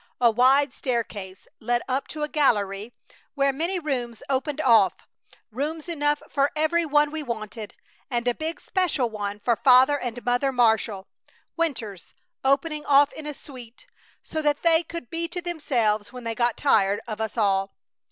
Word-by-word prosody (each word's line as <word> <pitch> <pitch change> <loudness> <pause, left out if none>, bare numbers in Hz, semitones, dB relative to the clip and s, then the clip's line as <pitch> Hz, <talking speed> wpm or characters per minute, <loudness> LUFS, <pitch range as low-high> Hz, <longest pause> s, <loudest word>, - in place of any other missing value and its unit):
A 240 -2 +5
wide 260 +4 +4
staircase 210 -7 -4
led 240 +1 0
up 265 +1 -1
to 305 -1 -5
a - - 0
gallery 210 -8 0 0.4
where 275 -1 +2
many 335 +7 -1
rooms 250 -8 -3
opened 275 +2 -1
off, 230 -9 +3 0.4
rooms 300 +7 -4
enough 295 -3 0
for 280 0 +1
every 320 +2 +1
one 295 0 +3
we 315 0 -4
wanted, 220 -4 -6 0.3
and 240 -2 -2
a 245 - +3
big 320 +5 -4
special 320 - 0
one 205 -1 -4
for 235 +2 +1
Father 265 +3 +5
and 245 -1 -6
Mother 245 +3 +1
Marshall, 220 -5 +1 0.5
winters, 240 - -4 0.3
opening 295 +3 +1
off 285 0 +5
in 310 -1 -8
a 300 - -4
suite, 250 -5 -13 0.4
so 315 - -4
that 295 -1 0
they 330 -1 +4
could 335 -7 -8
be 335 0 -2
to 355 +2 -5
themselves 245 -12 -1
when 250 -1 -9
they 230 0 -3
got 240 0 0
tired 200 -8 +3
of 215 -1 -5
us 220 +1 -4
all. 195 -2 +1
260 Hz, 165 wpm, -25 LUFS, 225-300 Hz, 0.5 s, A